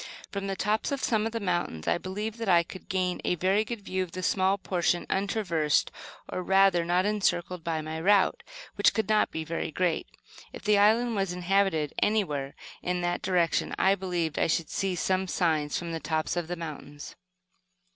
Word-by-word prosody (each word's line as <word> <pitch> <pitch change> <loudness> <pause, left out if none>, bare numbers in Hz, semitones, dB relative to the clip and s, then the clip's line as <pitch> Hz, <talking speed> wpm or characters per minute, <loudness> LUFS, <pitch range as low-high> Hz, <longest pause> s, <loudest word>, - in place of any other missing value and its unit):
From 200 -1 -4
the 195 - -2
tops 210 +6 0
of 280 -1 -2
some 220 -1 +1
of - - -5
the 230 - -3
mountains, 175 - -2
I - - +2
believed 210 +5 -5
that 225 -3 -2
I 170 -2 +5
could 185 +2 -12
gain 185 -1 -1
a - - +1
very 190 +5 +2
good 230 -1 -6
view 190 -1 -2
of 180 -3 -5
the 185 - -5
small 190 +2 +2
portion 175 -2 0
untraversed, 190 -7 +1 0.4
or 185 - -4
rather 190 -2 +4
not 175 +2 +1
encircled 180 -4 0
by 160 -1 -1
my 160 +1 -5
route, 195 +1 +3 0.3
which - - +3
could 220 -3 0
not 215 -1 +3
be 160 - -4
very 165 +1 -3
great. 170 +1 0 0.5
If - - -9
the 210 -1 +4
island 225 +3 +4
was 195 -3 -1
inhabited 180 -4 +1
anywhere 150 -11 0 0.3
in 180 0 -1
that 175 0 -1
direction, 175 -3 +1
I 190 - +4
believed 180 -5 -2
I - - +3
should 165 0 -1
see 190 -2 -1
some 185 +2 0
signs 155 -5 0
from 170 -1 -4
the 165 - -3
tops 155 +1 -1
of 175 -2 -2
the 175 - -3
mountains. 150 -3 -8
185 Hz, 195 wpm, -28 LUFS, 170-200 Hz, 0.5 s, I